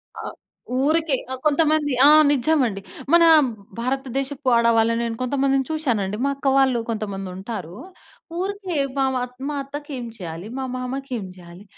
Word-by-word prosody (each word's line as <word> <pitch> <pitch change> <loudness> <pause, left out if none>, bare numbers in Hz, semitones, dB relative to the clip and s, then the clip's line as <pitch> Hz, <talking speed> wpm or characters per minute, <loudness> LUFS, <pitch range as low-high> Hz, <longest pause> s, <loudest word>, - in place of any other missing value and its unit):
ఆ! - - -7 0.6
ఊరికే 315 -2 +2 0.2
ఆహ్, 260 - -6
కొంతమంది 300 -1 +2
ఆ! - - +8 0.2
నజ్జమండి. 260 -7 +2 0.3
మన 340 0 +7 0.6
భారతదేశపు 270 +2 -3
ఆడవాళ్ళనేను 230 0 +2
కొంతమందిని 270 +1 +1
చూశానండి, 225 -10 -1
మా - - +2
అక్క 275 0 -4
వాళ్ళు 265 -3 +3
కొంతమందుంటారు. 195 -3 -5 0.6
ఊరికే 385 -2 -3 0.2
బ - - -7 0.2
మా, 250 - 0 0.3
మా 295 - -3
అత్తకేం 275 -2 -7
చెయ్యాలి? 170 0 -7
మా 265 - -2
మామకేం 255 -3 -4
జెయ్యాలి? 175 +2 -13
260 Hz, 120 wpm, -22 LUFS, 225-290 Hz, 0.6 s, ఆ